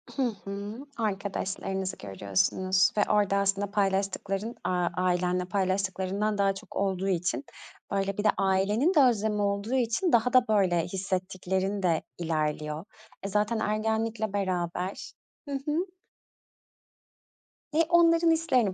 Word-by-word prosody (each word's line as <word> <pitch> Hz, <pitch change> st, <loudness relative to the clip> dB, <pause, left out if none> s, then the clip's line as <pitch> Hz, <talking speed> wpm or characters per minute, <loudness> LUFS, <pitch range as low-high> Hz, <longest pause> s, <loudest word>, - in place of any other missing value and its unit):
Hı 275 Hz, -, -1 dB, 0.2 s
hı. 200 Hz, +2 st, -5 dB, 0.2 s
Arkadaşlarınızı 195 Hz, -2 st, -2 dB
görüyorsunuz 100 Hz, -, +1 dB
ve -, -, +4 dB
orada 205 Hz, -2 st, +3 dB
aslında 200 Hz, 0 st, 0 dB
paylaştıkların, 195 Hz, +2 st, -1 dB
aaa, 180 Hz, -1 st, +1 dB
ailenle 180 Hz, 0 st, +1 dB
paylaştıklarından 195 Hz, +2 st, -1 dB
daha 195 Hz, -1 st, +3 dB
çok 195 Hz, -, -11 dB
olduğu 195 Hz, -1 st, 0 dB
için, 175 Hz, -8 st, -1 dB, 0.5 s
böyle, 195 Hz, 0 st, -1 dB
bir 205 Hz, -, -1 dB
de 210 Hz, -, +5 dB
ailenin 200 Hz, -, +2 dB
de 305 Hz, -, +5 dB
özlemi 220 Hz, -5 st, +3 dB
olduğu 200 Hz, +4 st, -1 dB
için 250 Hz, +8 st, +1 dB
daha 240 Hz, +2 st, +3 dB
da, 255 Hz, -1 st, +5 dB
böyle, 190 Hz, -6 st, +3 dB
hissettiklerinde 185 Hz, -1 st, -1 dB, 0.2 s
ilerliyor. 155 Hz, -1 st, -2 dB, 0.4 s
E, -, -, -2 dB
zaten 210 Hz, +3 st, 0 dB
ergenlikle 220 Hz, 0 st, -1 dB
beraber 185 Hz, -1 st, -2 dB, 0.4 s
Hı -, -, -4 dB
hı. 310 Hz, +4 st, 0 dB, 1.9 s
E, 300 Hz, -, -2 dB
onların 335 Hz, -1 st, +5 dB
hislerini 255 Hz, -, +2 dB
195 Hz, 120 wpm, -28 LUFS, 185-215 Hz, 1.9 s, de